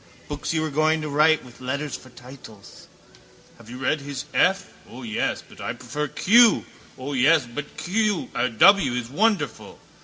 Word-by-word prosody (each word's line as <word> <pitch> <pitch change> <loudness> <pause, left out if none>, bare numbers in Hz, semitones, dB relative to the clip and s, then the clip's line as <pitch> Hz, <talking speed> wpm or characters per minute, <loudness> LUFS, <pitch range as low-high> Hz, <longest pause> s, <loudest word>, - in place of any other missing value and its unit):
Books 145 -1 -4
you 160 -1 0
were 155 - -3
going 155 +2 +1
to 155 - -4
write 155 +1 +3
with 125 0 -16
letters 140 +3 -3
for 130 - -12
titles. 125 -5 -14 0.7
Have 110 - -15
you 125 - -8
read 140 +3 -1
his 140 -1 -6
F? 195 +1 +1 0.2
O 125 +2 -10
yes, 110 -2 -2
but - - -14
I - - -3
prefer 150 0 -5
Q. 230 +8 +4 0.3
Yes, 140 +3 +2
but 140 +5 -8
W 185 - +2
is 120 -1 -4
wonderful. 210 +7 -1
145 Hz, 155 wpm, -23 LUFS, 125-160 Hz, 0.7 s, Q